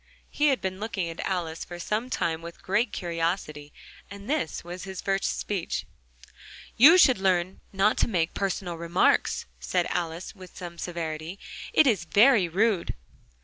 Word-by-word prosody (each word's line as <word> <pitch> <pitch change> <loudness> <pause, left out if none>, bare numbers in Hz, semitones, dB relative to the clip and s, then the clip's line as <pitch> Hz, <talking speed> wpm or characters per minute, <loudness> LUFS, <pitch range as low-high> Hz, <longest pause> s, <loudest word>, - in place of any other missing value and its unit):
He 300 - +2
had 270 -8 +2
been 190 0 -3
looking 210 -5 -3
at 165 - -8
Alice 170 -4 -2
for 175 - -9
some 215 +7 -2
time 165 -8 -1
with 170 0 -10
great 210 +6 +1
curiosity, 165 -4 -3 0.4
and 200 +1 -10
this 270 - -2
was 175 +1 -7
his 190 -1 -7
first 195 0 -1
speech. 195 -5 -3 0.9
"You 305 +10 +8
should 260 - +6
learn 185 -1 0
not 195 +2 +2
to - - +3
make 175 -7 0
personal 185 -3 -3
remarks," 170 +1 +2 0.3
Alice 170 0 -1
said - - -25
with 185 -2 -13
some 175 -2 -8
severity: 165 0 -4 0.3
"it's 235 - +3
very 205 - +5
rude." 195 +1 +1
185 Hz, 150 wpm, -27 LUFS, 170-205 Hz, 0.9 s, You